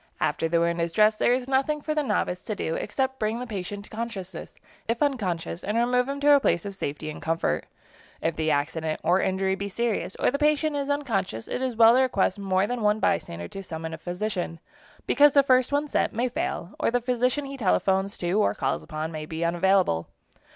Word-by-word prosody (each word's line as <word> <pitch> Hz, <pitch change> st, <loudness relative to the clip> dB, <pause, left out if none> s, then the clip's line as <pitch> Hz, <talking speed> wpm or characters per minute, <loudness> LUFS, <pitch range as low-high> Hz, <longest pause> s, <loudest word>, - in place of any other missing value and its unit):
After 165 Hz, -, 0 dB
the 170 Hz, 0 st, +2 dB
wound 170 Hz, 0 st, +1 dB
is 170 Hz, 0 st, -1 dB
dressed 215 Hz, 0 st, +4 dB
there -, -, +3 dB
is 250 Hz, 0 st, 0 dB
nothing 275 Hz, +3 st, +1 dB
for 305 Hz, +1 st, -2 dB
the 305 Hz, -, +1 dB
novice 180 Hz, -9 st, -1 dB
to 215 Hz, -, -3 dB
do, 160 Hz, -, -2 dB
except 265 Hz, +8 st, -2 dB
bring 220 Hz, +2 st, -1 dB
the 250 Hz, -, -4 dB
patient 205 Hz, -2 st, -5 dB
to -, -, -18 dB
consciousness, 205 Hz, -6 st, -6 dB, 0.3 s
if 230 Hz, +1 st, 0 dB
unconscious, 185 Hz, -, -2 dB
and 210 Hz, +3 st, -1 dB
remove 250 Hz, +2 st, +2 dB
him 280 Hz, 0 st, -3 dB
to 290 Hz, +1 st, +5 dB
a 285 Hz, -, +7 dB
place 175 Hz, -9 st, +1 dB
of 200 Hz, -, -4 dB
safety 155 Hz, -4 st, -5 dB
and -, -, -9 dB
comfort. 165 Hz, +1 st, -1 dB, 0.5 s
If 165 Hz, 0 st, -1 dB
the 160 Hz, 0 st, 0 dB
accident 155 Hz, +2 st, -1 dB
or 180 Hz, +3 st, +3 dB
injury 190 Hz, 0 st, 0 dB
be 200 Hz, +1 st, -4 dB
serious, 225 Hz, -2 st, -2 dB
or -, -, +1 dB
the 280 Hz, -, -2 dB
patient 300 Hz, 0 st, +2 dB
is 285 Hz, 0 st, -2 dB
unconscious, 200 Hz, -, -1 dB
it -, -, -3 dB
is 255 Hz, -2 st, -1 dB
well 225 Hz, 0 st, +7 dB
to 255 Hz, -, +4 dB
request 205 Hz, -6 st, +1 dB
more 190 Hz, -1 st, +1 dB
than 245 Hz, +2 st, -3 dB
one 210 Hz, 0 st, +2 dB
bystander 85 Hz, -, -1 dB
to 195 Hz, -, -7 dB
summon 160 Hz, -3 st, -6 dB
a -, -, -5 dB
physician, 180 Hz, -1 st, -3 dB, 0.5 s
because 290 Hz, 0 st, +5 dB
the 280 Hz, -, +6 dB
first 255 Hz, -1 st, +3 dB
one 290 Hz, +1 st, +1 dB
sent -, -, 0 dB
may 240 Hz, +3 st, 0 dB
fail, 195 Hz, -5 st, -3 dB
or -, -, +2 dB
the 245 Hz, +1 st, +1 dB
physician 250 Hz, +3 st, 0 dB
he 275 Hz, 0 st, -6 dB
telephones 195 Hz, -3 st, +1 dB
to 175 Hz, 0 st, -2 dB
or -, -, +1 dB
calls 135 Hz, 0 st, -1 dB
upon 155 Hz, +1 st, -5 dB
may 155 Hz, -1 st, -6 dB
be 160 Hz, +1 st, -3 dB
unavailable. 175 Hz, -, +2 dB
205 Hz, 220 wpm, -26 LUFS, 170-250 Hz, 0.5 s, a